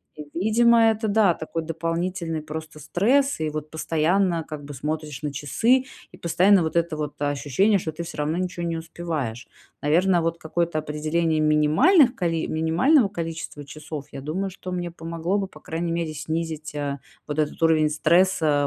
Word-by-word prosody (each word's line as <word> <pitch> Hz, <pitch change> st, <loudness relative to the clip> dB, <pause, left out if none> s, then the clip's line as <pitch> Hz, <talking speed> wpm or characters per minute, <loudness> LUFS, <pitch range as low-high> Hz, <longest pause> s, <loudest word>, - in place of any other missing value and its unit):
И 150 Hz, -, -8 dB
видимо, 235 Hz, +4 st, +4 dB
это, 220 Hz, 0 st, -2 dB
да, 205 Hz, -3 st, +4 dB
такой 165 Hz, 0 st, -5 dB
дополнительный 165 Hz, 0 st, -2 dB
просто 155 Hz, 0 st, -7 dB
стресс, 235 Hz, -, +2 dB
и 155 Hz, -1 st, -1 dB
вот 155 Hz, 0 st, -6 dB
постоянно, 165 Hz, +2 st, +1 dB
как 150 Hz, -2 st, -7 dB
бы, 145 Hz, 0 st, -8 dB
смотришь 150 Hz, 0 st, -4 dB
на 145 Hz, -2 st, -3 dB
часы, 230 Hz, -, +2 dB, 0.3 s
и -, -, -14 dB
постоянно 180 Hz, +3 st, +4 dB
вот 160 Hz, 0 st, -2 dB
это 170 Hz, -1 st, +1 dB
вот 150 Hz, -1 st, -5 dB
ощущение, 145 Hz, -, +2 dB
что 160 Hz, -, -4 dB
ты 165 Hz, +2 st, -6 dB
всё 165 Hz, -, -8 dB
равно 155 Hz, +3 st, 0 dB
ничего 180 Hz, -1 st, -3 dB
не 165 Hz, -1 st, -2 dB
успеваешь. 155 Hz, -8 st, -4 dB, 0.3 s
Наверно, 175 Hz, +4 st, +3 dB
вот 165 Hz, 0 st, -1 dB
какое-то 170 Hz, 0 st, -2 dB
определение 155 Hz, +2 st, -1 dB
минимальных 155 Hz, -, +4 dB
коли 165 Hz, -6 st, -1 dB
минимального 175 Hz, -, +3 dB
количества 165 Hz, -5 st, -6 dB
часов, 155 Hz, 0 st, -7 dB
я 135 Hz, -, -7 dB
думаю, 185 Hz, +7 st, -3 dB
что 185 Hz, 0 st, -8 dB
мне 175 Hz, -1 st, -3 dB
помогло 170 Hz, +3 st, -2 dB
бы, 195 Hz, -, -2 dB
по -, -, -15 dB
крайней 165 Hz, +1 st, -3 dB
мере, 165 Hz, -2 st, -2 dB
снизить, 160 Hz, 0 st, -4 dB
э, 145 Hz, -1 st, -3 dB, 0.3 s
вот 150 Hz, +1 st, -3 dB
этот 150 Hz, -1 st, -1 dB
уровень 155 Hz, -2 st, +4 dB
стресса, 155 Hz, -2 st, +3 dB
165 Hz, 170 wpm, -24 LUFS, 155-180 Hz, 0.3 s, видимо